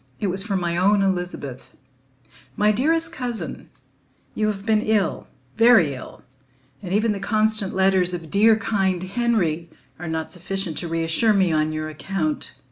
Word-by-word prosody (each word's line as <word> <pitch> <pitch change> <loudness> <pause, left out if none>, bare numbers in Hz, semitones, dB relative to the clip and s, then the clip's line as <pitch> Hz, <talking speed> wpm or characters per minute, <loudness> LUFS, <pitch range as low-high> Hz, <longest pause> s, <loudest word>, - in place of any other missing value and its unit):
It 200 -3 0
was 190 +1 0
from 200 -3 -1
my 170 -1 -1
own 200 +2 +3
Elizabeth: 175 -9 -3 0.8
"My 210 +1 +3
dearest 325 +9 +1
Cousin, 250 -7 -5 0.6
"You 215 - 0
have 200 -2 -3
been 220 -1 +3
ill, 215 -4 0 0.3
very 225 - +5
ill, 130 - -10 0.6
and 180 - -7
even 215 +3 +2
the 205 - -3
constant 215 0 +1
letters 190 -1 +3
of 170 -3 -6
dear 220 +2 +5
kind 195 -4 0
Henry 185 -6 0 0.3
are 175 - -6
not 160 0 -3
sufficient 180 -1 -3
to 175 - -4
reassure 165 +7 +1
me 190 -4 +2
on 155 0 +1
your 155 0 -3
account. 195 - -3
195 Hz, 155 wpm, -23 LUFS, 170-215 Hz, 0.8 s, very